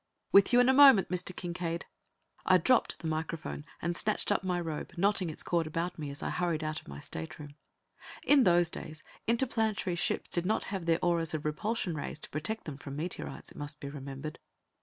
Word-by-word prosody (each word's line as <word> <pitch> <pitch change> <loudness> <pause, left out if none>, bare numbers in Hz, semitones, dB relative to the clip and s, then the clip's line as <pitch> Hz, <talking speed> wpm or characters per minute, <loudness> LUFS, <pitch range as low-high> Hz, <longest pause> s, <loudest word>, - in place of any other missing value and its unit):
"With 200 +3 +7
you 245 - +6
in 245 - +5
a 260 - +6
moment, 270 -8 +8
Mr. 180 0 -1
Kincaide!" 170 -1 -3 0.6
I 185 - +6
dropped 235 +9 +3
the 165 - -5
microphone 160 -1 -3 0.2
and 170 0 0
snatched 210 +2 0
up 200 - +1
my 180 -1 0
robe, 160 -3 -5
knotting 195 -1 +2
its 155 - -3
cord 170 -2 0
about 170 +2 -3
me 150 -2 -4
as 140 - -5
I - - -1
hurried 170 -3 -1
out 155 0 -3
of - - -24
my 70 0 -8
stateroom. 145 - -7 0.7
In 285 -2 +6
those 175 -3 +4
days, 155 0 -8 0.2
interplanetary 225 -6 +1
ships 175 - -1
did 175 - 0
not 215 - +1
have 185 -4 -3
their 165 -1 +4
auras 165 -2 +1
of 155 - -4
repulsion 185 +5 -1
rays 150 0 -4
to - - -9
protect 185 +10 -3
them 150 -4 -7
from 140 -1 -8
meteorites, 165 +4 -5
it - - -14
must 145 +1 -3
be 140 - -6
remembered. 140 +1 -7
170 Hz, 200 wpm, -31 LUFS, 155-190 Hz, 0.7 s, moment